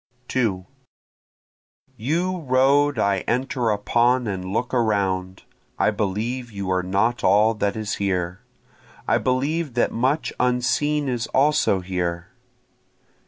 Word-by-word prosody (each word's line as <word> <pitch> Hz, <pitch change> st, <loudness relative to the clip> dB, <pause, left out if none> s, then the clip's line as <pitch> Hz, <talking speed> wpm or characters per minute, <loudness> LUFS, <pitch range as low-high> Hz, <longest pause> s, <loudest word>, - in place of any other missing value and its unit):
2 105 Hz, -8 st, 0 dB, 1.3 s
You 170 Hz, +10 st, -1 dB
road 140 Hz, +1 st, +3 dB
I 100 Hz, -1 st, +2 dB
enter 125 Hz, -1 st, 0 dB
upon 120 Hz, +4 st, +2 dB
and 95 Hz, -4 st, -3 dB
look 120 Hz, +5 st, -2 dB
around, 95 Hz, -6 st, 0 dB, 0.3 s
I -, -, +2 dB
believe 110 Hz, +5 st, -3 dB
you 100 Hz, -2 st, -4 dB
are 90 Hz, 0 st, +2 dB
not 100 Hz, +6 st, 0 dB
all 105 Hz, +3 st, +4 dB
that 100 Hz, -2 st, -1 dB
is 110 Hz, -1 st, -3 dB
here, 90 Hz, -2 st, -1 dB, 0.7 s
I -, -, +3 dB
believe 140 Hz, +2 st, -1 dB
that 120 Hz, -, +2 dB
much 130 Hz, +7 st, 0 dB
unseen 130 Hz, +4 st, +1 dB
is 120 Hz, -2 st, -2 dB
also 135 Hz, -8 st, +2 dB
here. 90 Hz, -1 st, -3 dB
115 Hz, 120 wpm, -23 LUFS, 100-130 Hz, 1.3 s, all